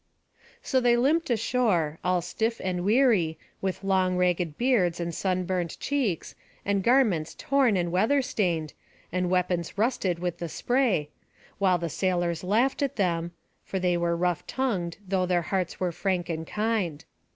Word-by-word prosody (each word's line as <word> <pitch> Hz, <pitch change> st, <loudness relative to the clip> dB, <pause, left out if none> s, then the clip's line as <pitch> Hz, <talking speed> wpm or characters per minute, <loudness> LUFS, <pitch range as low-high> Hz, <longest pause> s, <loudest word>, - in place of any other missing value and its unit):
So 260 Hz, -, +2 dB
they 240 Hz, -1 st, +3 dB
limped 300 Hz, +7 st, +2 dB
ashore, 215 Hz, -9 st, +1 dB
all 180 Hz, -1 st, +1 dB
stiff 225 Hz, +5 st, -2 dB
and 180 Hz, -1 st, -1 dB
weary, 210 Hz, -7 st, +3 dB, 0.2 s
with 190 Hz, 0 st, -3 dB
long 185 Hz, -2 st, +2 dB
ragged 180 Hz, -3 st, 0 dB
beards 210 Hz, -10 st, +2 dB
and 170 Hz, 0 st, -3 dB
sunburnt 185 Hz, -1 st, -1 dB
cheeks, 255 Hz, -, -1 dB, 0.3 s
and 200 Hz, -1 st, +1 dB
garments 215 Hz, -9 st, +2 dB
torn 265 Hz, -7 st, +2 dB
and 175 Hz, -1 st, -1 dB
weather 225 Hz, +10 st, +2 dB
stained, 170 Hz, -10 st, -1 dB, 0.4 s
and 180 Hz, 0 st, 0 dB
weapons 180 Hz, -1 st, 0 dB
rusted 205 Hz, -6 st, +1 dB
with 175 Hz, 0 st, -3 dB
the 170 Hz, -, -4 dB
spray, 235 Hz, -, +1 dB, 0.5 s
while 185 Hz, -2 st, +3 dB
the 170 Hz, 0 st, -3 dB
sailors 175 Hz, 0 st, -1 dB
laughed 230 Hz, +10 st, +1 dB
at 280 Hz, -2 st, 0 dB
them 170 Hz, -3 st, 0 dB, 0.3 s
(for 190 Hz, -, -4 dB
they 180 Hz, -1 st, +1 dB
were 170 Hz, 0 st, +1 dB
rough 175 Hz, -1 st, -1 dB
tongued, 195 Hz, -11 st, -2 dB
though 185 Hz, -1 st, +1 dB
their 175 Hz, -1 st, +1 dB
hearts 185 Hz, 0 st, -2 dB
were 180 Hz, -1 st, 0 dB
frank 175 Hz, 0 st, -1 dB
and 160 Hz, -1 st, -3 dB
kind). 210 Hz, -8 st, -1 dB
185 Hz, 155 wpm, -27 LUFS, 175-225 Hz, 0.5 s, they